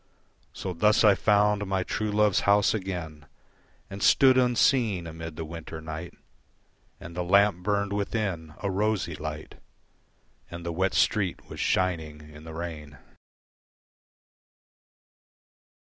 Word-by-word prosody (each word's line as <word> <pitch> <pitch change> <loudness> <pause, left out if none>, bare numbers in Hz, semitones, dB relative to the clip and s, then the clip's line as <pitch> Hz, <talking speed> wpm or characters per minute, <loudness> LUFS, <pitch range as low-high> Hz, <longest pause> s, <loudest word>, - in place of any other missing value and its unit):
So 95 - -5
thus 105 +7 +3
I 105 -2 +7
found 105 0 +2
my 95 -1 0
true 105 +3 -2
love's 105 -2 +3
house 100 0 +3
again 85 -7 -5 0.6
And 100 +1 -9
stood 130 -1 +5
unseen 120 -6 +2
amid 80 -1 -8
the 80 0 -5
winter 80 0 -8
night 80 +2 -7 0.8
And 85 +1 -10
the 90 - -2
lamp 100 0 +3
burned 100 +1 -1
within, 100 -6 -3
a 100 - 0
rosy 100 -3 -1
light, 75 0 -7 0.9
And 85 0 -8
the 85 - -3
wet 90 -1 0
street 95 +2 +1
was - - -8
shining 80 -4 -1
in 75 +1 -13
the 80 - -8
rain. 75 -4 -7
90 Hz, 125 wpm, -27 LUFS, 80-105 Hz, 0.9 s, I